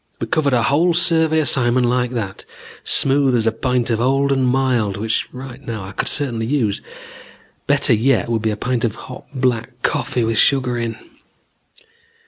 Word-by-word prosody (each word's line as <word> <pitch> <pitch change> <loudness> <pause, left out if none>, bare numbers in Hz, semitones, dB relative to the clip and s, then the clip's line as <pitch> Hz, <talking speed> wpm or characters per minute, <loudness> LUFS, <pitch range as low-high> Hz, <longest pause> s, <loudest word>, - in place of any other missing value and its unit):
We - - -2
covered 145 -4 +1
our 120 - +1
whole 160 +7 +2
survey 160 -2 +3
assignment 125 -3 +2
like 125 0 0
that, 105 -6 -5 0.4
smooth 135 -1 +3
as 115 -2 +1
a 115 - +3
pint 125 +1 -1
of 115 0 0
old 135 +2 +1
and 135 -2 +1
mild 125 -6 0
which 110 +2 -2
right 130 0 -9
now 115 -6 -6
I 95 - -8
could 95 - -3
certainly 120 -6 -1
use. 120 -7 0 0.9
Better 140 -2 +2
yet 120 +3 +2
would 115 -2 -1
be 110 - 0
a 105 - -3
pint 125 +2 -2
of 115 -3 -1
hot 125 - -11
black 125 -2 -2
coffee 120 - -1
with 115 -1 0
sugar 130 -3 +2
in. 115 -1 -3
125 Hz, 175 wpm, -19 LUFS, 115-135 Hz, 0.9 s, survey